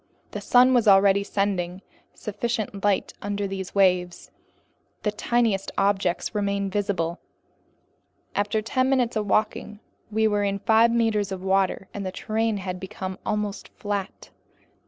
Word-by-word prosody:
The - - -5
sun 255 +1 +5
was 235 -3 +3
already 200 0 +6
sending 190 -2 -2 0.3
sufficient 210 -1 -4
light 205 -2 +1
under 205 0 -2
these 190 -1 -5
waves. 180 -3 +1 0.7
The 210 - +1
tiniest 220 -2 0
objects 195 -2 +1
remained 200 -1 -1
visible. 185 -4 -1 1.1
After 205 +1 0
ten 255 +3 +1
minutes 250 -3 +1
of 210 -1 -1
walking, 215 0 0 0.3
we 220 +1 +2
were 205 -1 +1
in 200 0 0
five 220 +3 +4
meters 225 -4 +1
of 190 -1 -5
water, 190 0 +1
and 200 - -5
the 185 - -3
terrain 220 +2 -1
had 185 -2 -5
become 190 0 -6
almost 210 -1 -2
flat. 205 -2 -4
205 Hz, 135 wpm, -25 LUFS, 195-215 Hz, 1.1 s, already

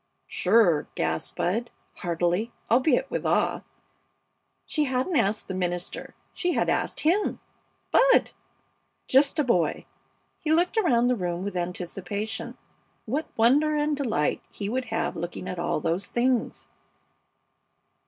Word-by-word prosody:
"Sure!" 180 -6 +3
gasped 80 0 -2
Bud, 230 +7 0 0.3
heartily, 175 +5 -1 0.2
albeit 280 - +3
with - - -2
awe. - - +1 1.0
She 305 -1 0
hadn't 260 +6 -1
asked 215 -4 +1
the 190 - -4
minister; 175 -1 -3 0.2
she 355 -1 -1
had - - +1
asked - - -1
him 360 +7 +1 0.5
Bud! - - +5 0.8
Just 275 +3 +4
a 300 - +3
boy! 180 - +1 0.5
He 310 - -2
looked 345 +6 +2
around 245 - +3
the 250 0 +3
room 175 -3 -3
with 200 -1 -4
anticipation. 180 +4 -4 0.5
What 290 +8 -2
wonder 285 +7 +4
and 300 0 +1
delight 225 - 0
he 200 -1 -4
would 255 +3 -1
have - - -2
looking 175 +2 -5
at 180 - -4
all 170 -2 0
those 165 +5 -1
things! 245 0 0
225 Hz, 130 wpm, -26 LUFS, 180-285 Hz, 1.0 s, Bud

